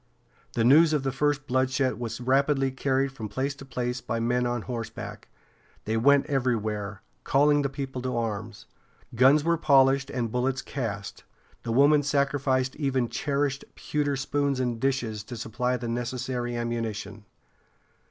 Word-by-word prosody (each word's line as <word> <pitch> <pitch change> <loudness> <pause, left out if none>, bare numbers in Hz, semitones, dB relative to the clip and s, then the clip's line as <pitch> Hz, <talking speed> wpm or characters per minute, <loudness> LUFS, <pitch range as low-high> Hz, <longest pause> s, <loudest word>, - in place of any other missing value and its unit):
The 115 - +1
news 155 +6 +6
of 150 -3 +1
the 135 - 0
first 145 +1 0
bloodshed 130 -2 0
was 120 -2 -4
rapidly 135 +2 +2
carried 135 +1 0
from 115 -6 -7
place 135 +7 -2
to 140 -1 -12
place 125 -1 -3
by 115 - -3
men 125 +1 +1
on 120 -2 -2
horseback. 115 -3 -6 0.6
They 110 - -1
went 140 +5 +4
everywhere, 110 -7 -2 0.2
calling 145 +1 +3
the 140 - -1
people 135 -2 -5
to 125 -1 -2
arms. 110 -1 -4 0.5
Guns 135 +5 +5
were 170 +1 +2
polished 135 -3 +4
and 120 -3 -2
bullets 130 +2 -1
cast, 105 -7 -5 0.4
the 115 - -4
women 145 +5 +5
sacrificing 140 -1 0
even 130 -4 0
cherished 140 -1 -1
pewter 145 -1 -1
spoons 140 0 -1
and 120 -3 -1
dishes 120 -5 -1
to 120 - -7
supply 125 +3 -1
the 120 - -5
necessary 120 +1 -3
ammunition. 110 -3 -4
130 Hz, 150 wpm, -27 LUFS, 120-140 Hz, 0.6 s, news